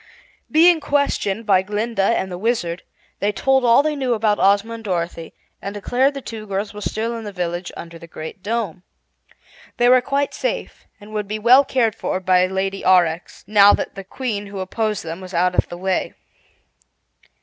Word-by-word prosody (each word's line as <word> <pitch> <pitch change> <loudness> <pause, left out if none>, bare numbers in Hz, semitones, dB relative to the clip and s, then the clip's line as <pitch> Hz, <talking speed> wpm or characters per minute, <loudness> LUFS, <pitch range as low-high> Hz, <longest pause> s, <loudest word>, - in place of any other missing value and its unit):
Being 330 +2 +5
questioned 280 -8 0
by 190 -3 +4
Glinda 210 +2 -2
and 195 -2 +1
the 180 - -5
Wizard, 185 -6 -1 0.4
they 205 - +1
told 265 +5 +2
all 240 +3 +5
they 305 0 0
knew 260 -4 0
about 215 -1 +1
Ozma 205 +3 +3
and 230 -1 -8
Dorothy 170 -4 -4 0.3
and 200 +1 -6
declared 255 +7 +1
the 275 - -6
two 220 -2 -8
girls 200 +2 -3
were 210 - -8
still 225 +3 -2
in 230 - -6
the 205 - -6
village 175 -1 -4
under 170 0 -9
the 170 - -12
Great 160 +4 -9
Dome. 205 -4 -3 1.0
They 240 0 +4
were 255 0 +6
quite 280 +3 -1
safe - - -4
and 210 +1 -13
would 210 -1 -3
be 215 +1 -3
well 245 +6 +6
cared 240 -5 +1
for 185 - -3
by 185 -1 +3
Lady 195 +1 -2
Aurex, 175 -2 +2
now 205 -1 +6
that - - -2
the 195 - -8
Queen 205 0 -4
who 200 0 -8
opposed 210 +2 -2
them 165 +2 -6
was 185 -1 -8
out 180 +1 +2
of - - +1
the 175 - -7
way. 190 +1 -2
205 Hz, 190 wpm, -20 LUFS, 185-235 Hz, 1.0 s, were